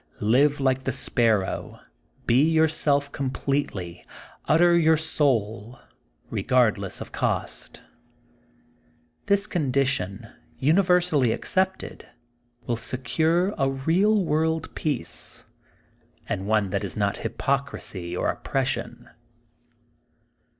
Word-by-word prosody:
''Live 140 +7 +3
like 130 -1 0
the 130 - 0
Sparrow. 115 -6 0 0.5
Be 120 +3 +4
yourself 155 -3 +2
completely. 130 -9 -3 0.4
Utter 170 +2 +4
your 160 -1 +4
soul, 120 -7 -1 0.5
regardless 110 -7 +1
of - - -8
cost - - -2
J' - - -21 1.5
This 200 0 +3
condition, 130 - -1 0.3
uni 155 +8 +3
versally 175 - +2
accepted, 190 +9 -2 0.6
wiU 120 -1 -1
secure 160 - 0
a 135 -1 +2
real 180 +10 +2
world 160 +1 0
peace, 140 - -2 0.8
and 95 +1 -3
one 105 -3 +1
that 100 - -1
is - - -4
not 100 -1 0
hypocrisy 115 -8 -3
or - - +1
op - - -13
pression. - - -2
135 Hz, 100 wpm, -25 LUFS, 115-160 Hz, 1.5 s, Be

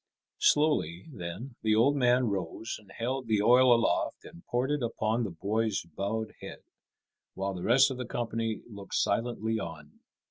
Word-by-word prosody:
Slowly, 145 - +2
then, 105 +4 -7
the 110 -1 +2
old 130 +6 +4
man 125 -1 +3
rose 100 +2 -3
and 100 -3 -19
held 125 +3 -3
the 105 -2 +2
oil 125 +2 +6
aloft 115 -1 +1
and 85 - -13
poured 125 +3 0
it 150 -1 0
upon 115 0 0
the 110 - -2
boy's 105 +5 -1
bowed 100 +7 -4
head, - - -9 0.7
while 95 0 -2
the 90 - -6
rest 135 +6 +5
of 130 - -5
the 125 - -4
company 115 -2 -2
looked 100 -4 -8
silently 110 0 0
on. 75 -5 -8
110 Hz, 165 wpm, -29 LUFS, 100-125 Hz, 0.7 s, oil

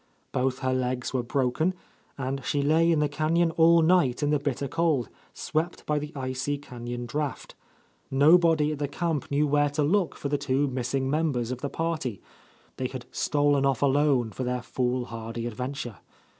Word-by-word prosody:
Both 130 0 0
her 130 - +2
legs 125 0 -2
were 130 - +1
broken, 135 +8 0 0.4
and 135 0 -3
she 145 +1 0
lay 165 +3 +4
in 165 - +3
the 150 - +3
canyon 160 +3 +1
all 165 0 +5
night 160 -6 +3
in 145 - +2
the 150 - +2
bitter 140 -1 -2
cold, 150 -3 +1 0.2
swept 160 +3 -3
by 150 -1 +1
the 150 +1 -6
icy 130 +2 -2
canyon 120 -3 -6
draught. 145 +3 -4 0.6
Nobody 155 +2 +5
at 150 - -4
the 145 - -1
camp 160 0 -2
knew 145 +1 +2
where 145 0 +2
to 145 +1 0
look 180 +4 +1
for - - -4
the 145 0 0
two 140 0 +1
missing 130 +1 -1
members 135 -5 0
of 125 - -4
the 140 - -2
party, 155 - -2 0.3
— - - -32
they 130 - -1
had 125 -1 -7
stolen 145 -2 +2
off 135 -1 +1
alone 140 -4 +3
for 130 - -4
their 125 0 -2
foolhardy 120 -3 -3
adventure. 120 -2 -5
140 Hz, 180 wpm, -27 LUFS, 125-150 Hz, 0.6 s, all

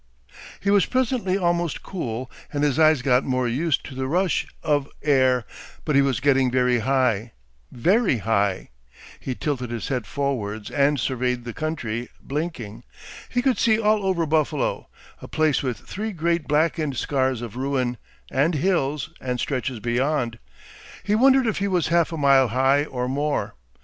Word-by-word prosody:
He 200 - 0
was 200 -2 +4
presently 245 -7 0
almost 175 -3 0
cool, 130 -9 -5 0.2
and 145 -1 -1
his 145 0 +1
eyes 155 -4 +5
got 125 -1 +3
more 130 -1 0
used 145 +5 0
to 145 - -8
the 130 0 -3
rush 180 +5 +1 0.2
of 145 -3 +1
air, 130 -5 +3 0.4
but 150 - 0
he 140 - +6
was 135 -3 +1
getting 135 -1 +3
very 125 -1 +2
high, 120 -3 +1 0.4
very 185 - +2
high. 100 -3 0 0.5
He 130 - -4
tilted 125 -4 -3
his 120 -2 -4
head 125 -7 -2
forwards 110 -7 -3
and 140 0 +2
surveyed 125 0 -1
the 120 - -5
country, 120 -7 -3
blinking. 130 -7 -5 0.5
He 245 0 0
could 260 -2 +2
see 220 -1 +3
all 215 -1 +2
over 185 -3 +1
Buffalo, 155 -2 0 0.3
a - - -8
place 155 -3 +1
with 125 -5 -2
three 215 - -5
great 170 -1 -1
blackened 150 -2 +1
scars 130 -2 0
of 115 -2 -7
ruin, 130 -2 -1 0.3
and 150 +6 +2
hills 150 -2 0
and 125 -1 -3
stretches 130 -2 -2
beyond. 120 0 -1 0.6
He 205 +2 0
wondered 265 +3 +5
if 220 -4 0
he 200 - 0
was 180 -5 0
half 170 0 +2
a 165 - -4
mile 135 -3 +5
high, 135 +5 +2
or 125 -3 -3
more. 145 +3 -1
140 Hz, 165 wpm, -23 LUFS, 125-165 Hz, 0.6 s, he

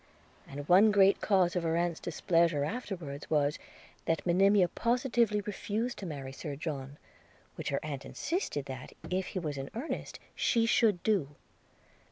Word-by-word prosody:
And 145 +1 -7
one 195 +5 +7
great 200 -1 +5
cause 190 -4 +2
of 180 - +1
her 165 0 0
aunt's 170 -1 0
displeasure 165 -3 +1
afterwards 170 - -5
was, 150 -1 +1 0.5
that 165 -1 0
Monimia 190 +2 +4
positively 235 -1 +1
refused 215 +4 -3
to 195 - -5
marry 140 -4 -6
Sir 145 +1 -6
John, 140 -2 -5 0.6
which - - -4
her 140 - 0
aunt 140 -3 -5
insisted 330 - -3
that, 130 -1 -8 0.2
if 185 +1 0
he - - -6
was 150 -5 -4
in 135 - -5
earnest, 260 +8 -5
she 230 -2 +2
should 220 -5 +3
do. 170 -10 +1
175 Hz, 155 wpm, -31 LUFS, 145-210 Hz, 0.6 s, one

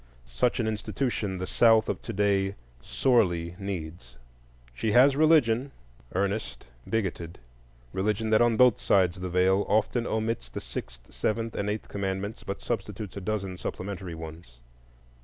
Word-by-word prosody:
Such 60 - 0
an 115 - +1
institution 105 -1 -2
the 90 - -3
South 115 +2 +4
of - - -2
to - - -6
day 100 -1 +1 0.3
sorely 90 - +1
needs. 80 -9 -6 0.6
She 105 - -1
has 130 +3 +6
religion, 140 -5 +4 0.5
earnest, 100 +3 -2 0.2
bigoted:—religion 85 - -3
that 110 - +5
on 120 -2 +3
both 125 -2 +5
sides 90 -2 +3
the 90 0 -4
Veil 95 +2 +3
often 110 +3 +1
omits 110 - -2
the - - -5
sixth, - - -8
seventh, 115 +1 -1
and 100 - -2
eighth 105 +1 -3
commandments, 100 +1 -3
but 100 0 -5
substitutes 105 -3 -4
a 100 - -5
dozen 95 -2 -3
supplementary 95 -2 -5
ones. 80 -6 -10
100 Hz, 140 wpm, -27 LUFS, 90-110 Hz, 0.6 s, has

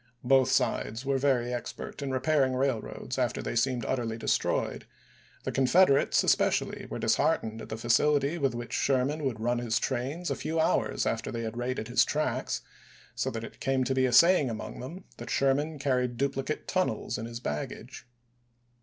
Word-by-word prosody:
Both 130 0 +4
sides 120 -2 0
were 135 -1 +1
very 125 -3 +1
ex 120 -2 -4
pert - - -8
in 140 - -3
repairing 130 0 +1
railroads 130 0 -2
after 125 -3 0
they - - -4
seemed 120 -1 +1
utterly 115 -3 -2
destroyed; 115 - -1 0.6
the - - -2
Confederates, 140 +3 +4
especially, - - +1
were - - -4
disheartened 110 0 +1
at - - -9
the 110 - -4
facility 140 +7 +2
with 135 -4 0
which 120 0 -6
Sher 130 -2 +2
man 150 +2 -3
would 125 -5 -2
run 120 +2 0
his 120 -2 0
trains 140 +8 -2
a - - 0
few 160 +1 -2
hours 160 - +1
after - - -2
they 115 0 -4
had 110 0 -4
raided 120 -2 -3
his - - +4
tracks; - - -1 0.5
so - - -1
that 115 0 -5
it - - -10
came 135 -1 +1
to 130 +1 0
be 130 0 +2
a - - -1
say 175 +8 +7
ing 135 - -1
among 110 -1 -6
them 165 +10 -8
that - - -8
Sherman 145 +3 +1
carried 125 -3 0
duplicate 140 +2 -2
tunnels 185 - -1
in 115 - -5
his 115 0 -6
baggage. 75 +5 -6
130 Hz, 185 wpm, -29 LUFS, 120-140 Hz, 0.6 s, say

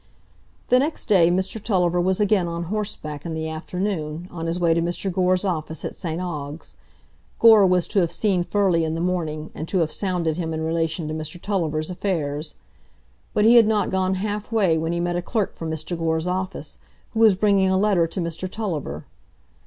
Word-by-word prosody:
The 250 - +5
next 300 +4 -1
day 180 -6 +5
Mr 190 +4 -1
Tulliver 180 -5 +2
was 185 +2 +1
again 205 -4 +2
on 170 0 -3
horseback 155 -9 -4
in 165 -2 -4
the 160 0 -3
afternoon, 165 0 -3
on 165 -1 -5
his 170 +2 -1
way 170 -2 +3
to 170 - +1
Mr 175 +3 -2
Gore's 185 +1 +2
office 160 -4 -3
at - - -4
St 165 -1 -4
Ogg's. 150 -4 -6 0.6
Gore 220 -4 +7
was 180 -1 +2
to 205 - +2
have 170 -3 +1
seen 195 -5 +1
Furley 180 -2 +2
in 160 0 -1
the - - -3
morning, 165 -3 -2
and 155 - -6
to 190 - -1
have 160 -3 +1
sounded 175 -5 -1
him 165 -2 -2
in 160 - -3
relation 165 0 -1
to 155 - -3
Mr 155 +2 -5
Tulliver's 165 -5 -1
affairs. 155 -5 -2 0.8
But 210 - +3
he 235 +2 +7
had 225 -2 +7
not 215 -2 +1
gone 190 0 +1
half 210 +3 -3
way 195 -7 +3
when 160 +1 -1
he 170 - -1
met 175 0 -1
a - - -1
clerk 210 +2 -1
from 165 - -6
Mr 160 +2 -3
Gore's 160 -1 -1
office, 185 +1 -3 0.3
who 225 - -3
was 220 -4 +6
bringing 195 -1 +3
a 190 - +2
letter 190 -4 +3
to 175 - -6
Mr 170 +2 -3
Tulliver. 165 - -4
175 Hz, 200 wpm, -23 LUFS, 160-195 Hz, 0.8 s, Gore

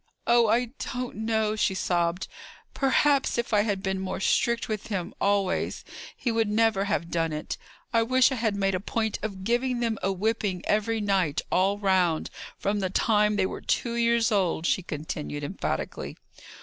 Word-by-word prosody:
"Oh, 235 -1 +5
I 235 +2 +2 0.2
don't 250 0 -4
know," 220 -1 0
she 200 -3 +1
sobbed. 175 -1 0 0.5
"Perhaps, 275 0 +2
if 235 -1 -2
I 210 - +5
had 205 -3 -1
been 190 -1 -1
more 190 -1 -3
strict 235 +4 +1
with 215 -2 -4
him 190 -5 -3
always, 200 -2 0 0.3
he 240 - -1
would 225 -2 +1
never 215 -2 +2
have 170 -5 -1
done 165 -1 0
it. 150 0 -4 0.4
I 230 - +4
wish 255 +4 +4
I - - 0
had 220 -3 +1
made 195 -1 +1
a 185 - 0
point 220 +2 -2
of 195 -3 -5
giving 240 +3 0
them 230 -3 -1
a 195 - +1
whipping 200 -1 -1
every 215 +1 +1
night, 190 -7 +1
all 195 +3 +2
round, 185 -5 +1 0.3
from 205 +1 -1
the 190 -2 -1
time 210 +1 +2
they 195 -2 +2
were - - -5
two 235 - 0
years 235 -1 +2
old!" 185 -5 +1
she 185 - +2
continued, 150 -2 -5
emphatically. 185 +7 -4
205 Hz, 175 wpm, -27 LUFS, 190-230 Hz, 0.5 s, Oh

